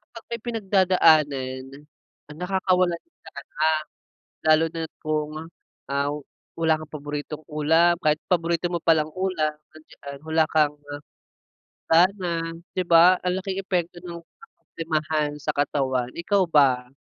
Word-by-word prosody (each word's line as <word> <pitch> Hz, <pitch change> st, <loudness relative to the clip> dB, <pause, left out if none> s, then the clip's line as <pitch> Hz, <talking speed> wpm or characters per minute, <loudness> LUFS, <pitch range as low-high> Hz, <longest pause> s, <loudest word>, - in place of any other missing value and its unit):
Kapag 230 Hz, -, -10 dB
may 235 Hz, -1 st, -4 dB
pinagdadaanan 165 Hz, -, +2 dB, 0.6 s
ang 150 Hz, -, -11 dB
nakakawala 185 Hz, -1 st, +1 dB
ng 335 Hz, -, -36 dB
gana, -, -, -14 dB, 1.2 s
lalo 155 Hz, +1 st, +5 dB
na't 165 Hz, -1 st, -5 dB
kung, 155 Hz, -1 st, -2 dB, 0.6 s
ah, 140 Hz, +1 st, 0 dB, 0.5 s
wala 160 Hz, -1 st, +3 dB
kang 155 Hz, -1 st, -7 dB
paboritong 150 Hz, +1 st, -6 dB
ulam, 160 Hz, +3 st, +3 dB
kahit 150 Hz, 0 st, +2 dB
paborito 170 Hz, -1 st, 0 dB
mo 175 Hz, -1 st, -3 dB
palang 155 Hz, -2 st, +3 dB
ulam 185 Hz, -5 st, -1 dB, 0.2 s
andiyan 140 Hz, -2 st, -11 dB
wala 160 Hz, 0 st, +3 dB
kang, 150 Hz, -2 st, +2 dB, 0.2 s
ah, 145 Hz, 0 st, -6 dB, 0.9 s
gana 170 Hz, -1 st, +2 dB, 0.2 s
'di 185 Hz, -, -1 dB
ba? 175 Hz, +2 st, +6 dB
Ang 180 Hz, 0 st, -1 dB
laking 195 Hz, -1 st, -3 dB
epekto 175 Hz, -2 st, -2 dB
ng 170 Hz, -1 st, -9 dB
ka-problemahan 155 Hz, -, -4 dB
sa -, -, 0 dB
katawan, 130 Hz, -3 st, 0 dB
ikaw 190 Hz, +2 st, +1 dB
ba? 130 Hz, -5 st, +3 dB
160 Hz, 125 wpm, -24 LUFS, 150-180 Hz, 1.2 s, ba